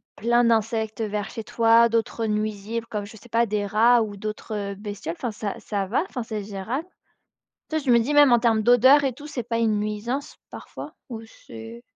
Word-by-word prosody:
plein 240 +2 +2
d'insectes, 225 -1 0
heu, - - 0
vers 205 0 -3
chez 225 - -7
toi, 230 +1 +4
d'autres, 230 0 -1
heu, - - 0
nuisibles 215 +1 -3
comme 210 -2 -4
je 220 +2 -12
sais 240 - -16
pas, 230 +1 +2
des 210 -1 -2
rats 230 +4 +4
ou 210 -2 -3
d'autres, 215 +2 -6
heu, 200 -1 -4
bestioles, 205 -4 -6
enfin 245 - -3
ça 205 -1 -4
ça 200 -2 -3
va, 235 - +1
enfin 250 -9 -5
c'est 215 -2 -5
gérable? 215 - -5 0.8
Tu 315 - -1
vois, 310 - -2
je 265 - +1
me 235 - +6
dis 250 +6 -1
même 290 -3 +6
en 240 - +6
termes 225 -2 +2
d'odeurs 260 +5 +6
et 270 - +1
tout, 290 +5 -11
c'est 255 -5 -4
pas 230 0 -2
une 220 -2 +1
nuisance 215 +6 -4
parfois - - -9
ou 230 -3 -7 0.2
c'est 115 +1 -10
225 Hz, 220 wpm, -24 LUFS, 210-240 Hz, 0.8 s, me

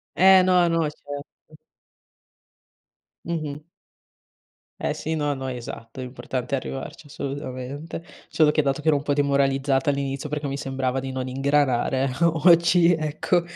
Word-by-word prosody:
Eh, 190 0 +7
no, 180 -2 +4
no, 165 0 +1
certo. 145 -1 -11 1.7
Mh-mh. 155 -4 -3 1.2
Eh - - -1
sì, 160 +1 -3
no, 145 -1 0
no, 135 0 -5
esatto, 120 0 -7
l'importante 125 +1 -4
è - - +3
arrivarci, 135 +3 -7
assolutamente. 140 +3 -6 0.3
Solo 150 -2 +3
che 155 - +2
dato 140 +1 0
che 155 - -12
ero 155 -2 +5
un 140 - -3
po' 145 - 0
demoralizzata 140 -1 +2
all'inizio 140 +1 -2
perché 150 0 -3
mi 140 0 -3
sembrava 135 -1 -2
di 135 0 -5
non 130 0 -3
ingranare 135 -1 +1
o 165 -2 +2
oggi, 170 0 +6
ecco, 155 +3 0
140 Hz, 140 wpm, -24 LUFS, 135-155 Hz, 1.7 s, Eh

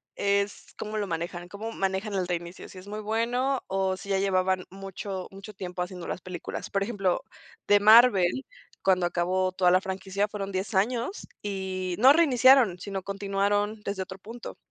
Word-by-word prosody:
es, 200 0 -1
cómo 215 0 -4
lo 205 -1 -1
manejan, 175 +1 -4
cómo 215 +4 -6
manejan 195 +2 -2
el 190 -2 0
reinicio. 175 0 -5
Si - - -13
es 185 +2 -11
muy 210 +1 -5
bueno, 245 +5 0
o 190 -1 0
si 195 - -11
ya 195 -1 +2
llevaban 185 -1 +1
mucho 195 0 -6
mucho 195 +2 -10
tiempo 180 -2 -5
haciendo 180 -1 -5
las - - -4
películas. 180 -1 -6
Por 195 0 0
ejemplo, 195 -4 0 0.5
de 205 0 +6
Marvel, 215 0 +6 0.4
cuando 185 -2 +3
acabó 185 +2 0
toda 180 -1 +3
la 185 +1 +4
franquicia 195 +1 -2
fueron 200 -1 -5
10 190 +3 -3
años, 235 - 0
y 190 -2 -3
no 260 +5 +8
reiniciaron, 260 - +5
sino 195 +1 -4
continuaron 200 +2 -1
desde 200 -2 -3
otro 190 0 -10
punto. 230 +5 -9
195 Hz, 170 wpm, -27 LUFS, 185-210 Hz, 0.5 s, no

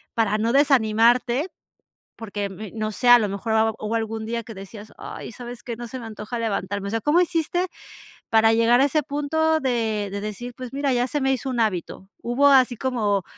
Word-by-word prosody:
para 215 -2 +1
no 225 +2 +1
desanimarte? 245 - +3 0.7
Porque, 205 -3 -4
mm, 205 +1 -8
no 215 0 -2
sé, 245 +4 -2
a 245 - +10
lo 210 - 0
mejor 200 +3 -3
hab 220 0 +2
hubo 215 +2 -2
algún 225 0 -3
día 230 +1 -3
que 225 - -9
decías, 205 +2 -11
ay, - - -8
¿sabes 245 0 -9
qué? 235 - -5
No 240 0 -6
se 260 +2 -7
me 230 - -8
antoja 215 +2 -6
levantarme. 200 -2 -2
O - - -4
sea, 225 - 0
¿cómo 310 - +3
hiciste 350 +1 0 0.6
para 225 0 +5
llegar 230 +2 +4
a - - +6
ese 305 +2 +1
punto 315 +3 0
de 225 -5 -1
de 200 - -3
decir, 240 +4 -6
pues 255 0 -8
mira, 280 -1 0
ya 245 +1 +1
se 295 - -2
me 270 0 +2
hizo 265 +1 -2
un 245 - -3
hábito, 190 -2 -2
¿hubo 245 +4 +2
así 260 -3 +5
como, 210 -7 0
230 Hz, 210 wpm, -23 LUFS, 215-260 Hz, 0.7 s, a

